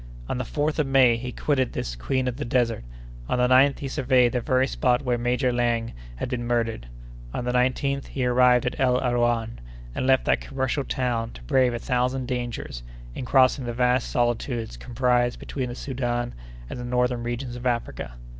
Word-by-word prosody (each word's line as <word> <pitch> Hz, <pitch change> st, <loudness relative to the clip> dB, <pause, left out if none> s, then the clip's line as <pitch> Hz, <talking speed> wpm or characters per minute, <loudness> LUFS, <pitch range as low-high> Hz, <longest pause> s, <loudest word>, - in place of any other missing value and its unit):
On -, -, -2 dB
the -, -, -1 dB
4th 150 Hz, +5 st, -1 dB
of 150 Hz, -, +2 dB
May 130 Hz, -3 st, +5 dB
he 125 Hz, +2 st, -5 dB
quitted 130 Hz, -1 st, 0 dB
this -, -, -3 dB
'Queen 130 Hz, -, -1 dB
of 125 Hz, -1 st, -2 dB
the 145 Hz, -, -3 dB
desert;' 120 Hz, -, 0 dB, 0.5 s
on -, -, +1 dB
the 125 Hz, 0 st, +3 dB
9th, 130 Hz, +2 st, +5 dB
he 140 Hz, -, -5 dB
surveyed 130 Hz, -3 st, +3 dB
the 125 Hz, -, -1 dB
very 130 Hz, +2 st, +2 dB
spot 125 Hz, -1 st, +1 dB
where 125 Hz, -2 st, +1 dB
Major 125 Hz, +1 st, 0 dB
Laing 120 Hz, -1 st, 0 dB, 0.2 s
had -, -, -4 dB
been 120 Hz, -1 st, -3 dB
murdered; 115 Hz, -, -1 dB, 0.5 s
on 125 Hz, -, -3 dB
the 125 Hz, -, 0 dB
19th, 130 Hz, +2 st, 0 dB
he 130 Hz, -2 st, -2 dB
arrived 125 Hz, 0 st, +4 dB
at 125 Hz, -, -2 dB
El 125 Hz, -1 st, +3 dB
Arouan, 120 Hz, -2 st, 0 dB, 0.3 s
and 130 Hz, -, -2 dB
left 130 Hz, -1 st, +4 dB
that -, -, +2 dB
commercial 135 Hz, +1 st, -2 dB
town 120 Hz, -4 st, -1 dB
to -, -, -12 dB
brave 125 Hz, -, +2 dB
a -, -, -1 dB
thousand 125 Hz, +2 st, -1 dB
dangers 120 Hz, -, -4 dB, 0.3 s
in 125 Hz, -, -5 dB
crossing 130 Hz, +1 st, +4 dB
the 120 Hz, -, -3 dB
vast 125 Hz, +1 st, +1 dB
solitudes 120 Hz, -, -1 dB
comprised 120 Hz, -, +1 dB
between 130 Hz, -3 st, -4 dB
the 120 Hz, -, -6 dB
Soudan 120 Hz, -3 st, -2 dB, 0.3 s
and 125 Hz, -, -6 dB
the -, -, -5 dB
northern 125 Hz, 0 st, 0 dB
regions 120 Hz, +1 st, -4 dB
of 125 Hz, +1 st, -3 dB
Africa. 120 Hz, -, -2 dB
125 Hz, 190 wpm, -25 LUFS, 120-130 Hz, 0.5 s, May